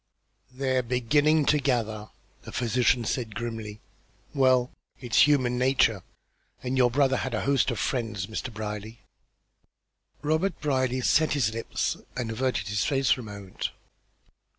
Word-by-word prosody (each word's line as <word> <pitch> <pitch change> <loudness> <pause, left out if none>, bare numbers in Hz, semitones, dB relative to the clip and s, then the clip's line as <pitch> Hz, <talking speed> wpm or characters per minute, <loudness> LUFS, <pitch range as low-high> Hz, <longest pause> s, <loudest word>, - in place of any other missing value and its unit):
"They're 130 0 0
beginning 145 +6 +2
to 150 - +3
gather," 110 -6 -1 0.3
the - - -10
physician 120 0 +1
said, 110 -2 -3
grimly. 110 -3 -5 0.5
"Well, 130 -2 +3 0.3
it's 125 +2 +4
human 130 -4 +2
nature, 125 -6 +3 0.6
and 130 +1 -2
your 125 -2 +4
brother 135 +1 +2
had 130 -3 -2
a - - -1
host 140 -2 +2
of - - -2
friends, 110 -8 -2
Mr. 110 +4 -5
Brierly." 105 +1 -6 1.2
Robert 160 +4 0
Brierly 130 -3 0
set 155 +5 +3
his 130 -7 +1
lips 115 0 -2 0.2
and 120 -3 -2
averted 115 -5 -1
his 105 0 0
face 135 -3 +1
for 125 - +2
a - - -9
moment. 100 -3 -6
125 Hz, 140 wpm, -27 LUFS, 110-135 Hz, 1.2 s, it's